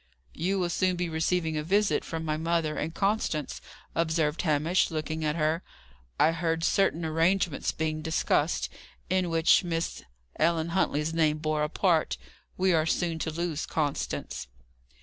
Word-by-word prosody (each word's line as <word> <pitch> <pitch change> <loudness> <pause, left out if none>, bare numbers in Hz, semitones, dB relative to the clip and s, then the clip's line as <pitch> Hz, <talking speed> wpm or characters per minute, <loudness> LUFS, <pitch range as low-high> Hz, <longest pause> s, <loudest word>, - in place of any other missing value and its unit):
"You 190 +4 -1
will 175 -2 0
soon 185 0 +1
be 175 -1 -2
receiving 160 0 0
a 150 - -1
visit 200 +5 +2
from 160 -1 -4
my 155 -1 0
mother 160 -1 0
and 160 - -2
Constance," 195 -6 -1 0.3
observed 160 -2 +1
Hamish, 155 +2 +2
looking 155 -1 -3
at 150 0 0
her. 160 +1 +1 0.6
"I 160 - +5
heard 165 0 -1
certain 170 -4 +2
arrangements 165 +1 +1
being 155 -1 -2
discussed, 160 0 +1 0.4
in 185 -2 +2
which 165 +2 +4
Miss 165 -1 -2 0.4
Ellen 165 +1 +2
Huntley's 160 -3 0
name 155 -2 +2
bore 155 0 -1
a 150 - 0
part. 170 -2 +1 0.4
We 185 0 +3
are 160 -1 +2
soon 165 -1 0
to 160 - -2
lose 165 -1 -3
Constance." 145 - -2
165 Hz, 150 wpm, -28 LUFS, 155-175 Hz, 0.6 s, I